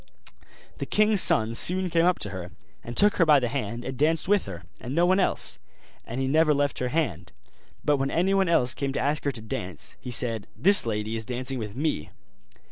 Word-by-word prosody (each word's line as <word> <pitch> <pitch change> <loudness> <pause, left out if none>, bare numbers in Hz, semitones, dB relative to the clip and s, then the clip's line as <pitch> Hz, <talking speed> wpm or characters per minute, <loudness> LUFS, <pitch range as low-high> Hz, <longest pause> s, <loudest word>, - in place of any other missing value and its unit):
The - - -5
king's 215 -2 +3
son 110 +1 +3
soon 180 +8 +4
came 165 0 +2
up 180 - +2
to 105 - -4
her, 90 -3 -7 0.3
and 120 - -9
took 205 +1 +5
her 170 - +3
by 150 -2 +6
the 120 -2 -2
hand 120 -2 -5
and 130 - -5
danced 155 +5 0
with 205 0 +1
her, 95 -2 -8 0.2
and 130 +3 -6
no 170 +1 +3
one 185 +2 +2
else: 185 - +1 0.5
and 120 +3 -6
he 135 - -1
never 155 +2 +2
left 145 0 -1
her 125 - -2
hand; 120 - -3 0.5
but 145 -1 +2
when 135 0 -2
anyone 190 +3 +1
else 125 -7 +2
came 135 -1 -4
to - - -3
ask 145 +2 -2
her 140 - +1
to 120 - -10
dance, 90 -6 -7
he - - -8
said, 115 -3 -2
'This 195 -8 +6
lady 105 0 -3
is 110 - -5
dancing 130 +1 -4
with 105 -2 -7
me. 140 - -3
135 Hz, 215 wpm, -25 LUFS, 115-165 Hz, 0.5 s, by